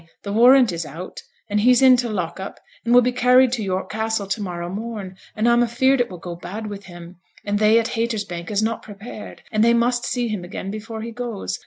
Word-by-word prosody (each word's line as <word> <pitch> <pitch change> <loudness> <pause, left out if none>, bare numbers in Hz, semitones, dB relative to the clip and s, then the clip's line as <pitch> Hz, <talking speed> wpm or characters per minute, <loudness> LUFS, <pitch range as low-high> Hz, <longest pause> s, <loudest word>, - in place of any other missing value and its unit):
the 200 - -4
warrant 245 +1 +6
is 170 -1 -3
out, 165 +5 -8 0.3
and 210 0 0
he's 245 +3 +5
in 260 -1 +7
t' 245 -1 -1
lock 180 -5 -3
up, 190 - -7 0.2
and 235 - -1
will 245 0 +7
be 250 - +1
carried 250 0 +4
to 245 -3 -2
York 190 -2 -2
Castle 220 -1 -1
to 195 +2 -3
morrow 175 -3 -4
morn; 205 -1 -6 0.2
and 220 +2 +1
I'm 240 0 +4
afeared 250 +3 +2
it 245 - -1
will 180 - -8
go 175 0 -7
bad 205 +6 -7
with 205 -1 -7
him; 175 -1 -12 0.3
and 205 0 0
they 215 +1 +5
at 230 +1 +1
Haytersbank 215 -7 -3
is 210 0 0
not 225 +1 -1
prepared, 210 +1 -10
and 215 0 +2
they 235 +1 +5
must 240 +1 +1
see 245 -1 -1
him 210 -5 -4
again 190 +2 -6
before 220 +1 -6
he 230 - -6
goes. 225 - -5
215 Hz, 230 wpm, -22 LUFS, 190-235 Hz, 0.3 s, in